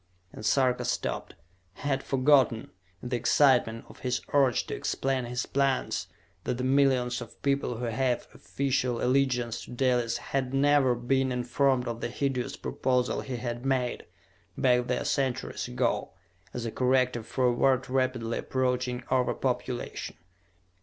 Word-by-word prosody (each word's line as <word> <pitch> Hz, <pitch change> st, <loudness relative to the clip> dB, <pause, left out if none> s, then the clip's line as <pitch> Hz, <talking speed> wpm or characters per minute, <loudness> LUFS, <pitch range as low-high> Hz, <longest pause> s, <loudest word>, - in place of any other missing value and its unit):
And -, -, -9 dB
Sarka 125 Hz, +2 st, +2 dB
stopped. -, -, -3 dB, 0.4 s
He -, -, -14 dB
had 135 Hz, -2 st, 0 dB
forgotten, 135 Hz, -2 st, +3 dB, 0.3 s
in 125 Hz, -, -5 dB
the 125 Hz, -, 0 dB
excitement 120 Hz, -4 st, +3 dB
of -, -, -15 dB
his 125 Hz, -1 st, -1 dB
urge 135 Hz, -5 st, +3 dB
to -, -, -5 dB
explain 135 Hz, -2 st, -1 dB
his 125 Hz, +1 st, -3 dB
plans, 135 Hz, -1 st, 0 dB, 0.4 s
that 120 Hz, -, -2 dB
the 125 Hz, -, -3 dB
millions 130 Hz, -2 st, +2 dB
of 120 Hz, -, -10 dB
people 140 Hz, -4 st, 0 dB
who 120 Hz, +1 st, -3 dB
gave 120 Hz, +2 st, 0 dB
official 130 Hz, -3 st, -1 dB
allegiance 125 Hz, -3 st, +1 dB
to -, -, -16 dB
Dalis 125 Hz, -2 st, +1 dB
had 135 Hz, -1 st, -2 dB
never 140 Hz, -2 st, +4 dB
been 130 Hz, +2 st, +1 dB
informed 125 Hz, +1 st, +1 dB
of 115 Hz, -1 st, -4 dB
the -, -, -2 dB
hideous 130 Hz, 0 st, -2 dB
proposal 125 Hz, -1 st, 0 dB
he 130 Hz, -, -5 dB
had 120 Hz, 0 st, -4 dB
made, 130 Hz, -2 st, -1 dB, 0.5 s
back 125 Hz, -1 st, +3 dB
there 125 Hz, -, -1 dB
centuries 130 Hz, -2 st, -1 dB
ago, -, -, -1 dB, 0.4 s
as 120 Hz, +2 st, -5 dB
a 115 Hz, -, -2 dB
corrective 125 Hz, -2 st, +1 dB
for 130 Hz, -, 0 dB
a 125 Hz, -, +5 dB
world 130 Hz, +1 st, +2 dB
rapidly 130 Hz, -3 st, 0 dB
approaching 125 Hz, -1 st, -1 dB
over 130 Hz, -1 st, +2 dB
population. -, -, -3 dB
125 Hz, 150 wpm, -28 LUFS, 120-135 Hz, 0.5 s, a